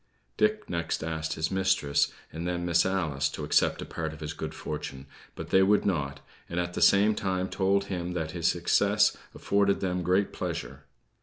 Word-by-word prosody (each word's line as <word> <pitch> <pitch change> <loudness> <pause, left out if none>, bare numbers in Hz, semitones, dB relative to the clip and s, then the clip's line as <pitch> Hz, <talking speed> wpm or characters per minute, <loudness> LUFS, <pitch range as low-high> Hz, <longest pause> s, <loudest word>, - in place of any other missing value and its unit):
Dick 215 0 +1
next 85 -1 -2
asked 80 0 -2
his 80 0 -2
mistress, 95 -7 +2 0.2
and 85 +3 -4
then 85 0 -2
Miss 85 +1 +3
Alice, 80 -8 0
to - - -6
accept - - +2
a - - -8
part 80 -1 -4
of 80 - -11
his 75 0 -5
good - - -6
fortune; 65 0 -6 0.3
but - - -7
they 95 - +6
would 100 +2 +3
not, 70 -7 -1 0.3
and 85 - -2
at 90 0 -2
the - - -3
same 105 +2 +5
time 95 -2 -1
told 100 +1 +1
him 90 -3 -4
that 80 -3 -3
his 85 -1 -1
success 100 +4 +3 0.2
afforded 100 0 +1
them 90 -2 -1
great 95 +3 +1
pleasure. - - -5
90 Hz, 185 wpm, -28 LUFS, 80-95 Hz, 0.3 s, they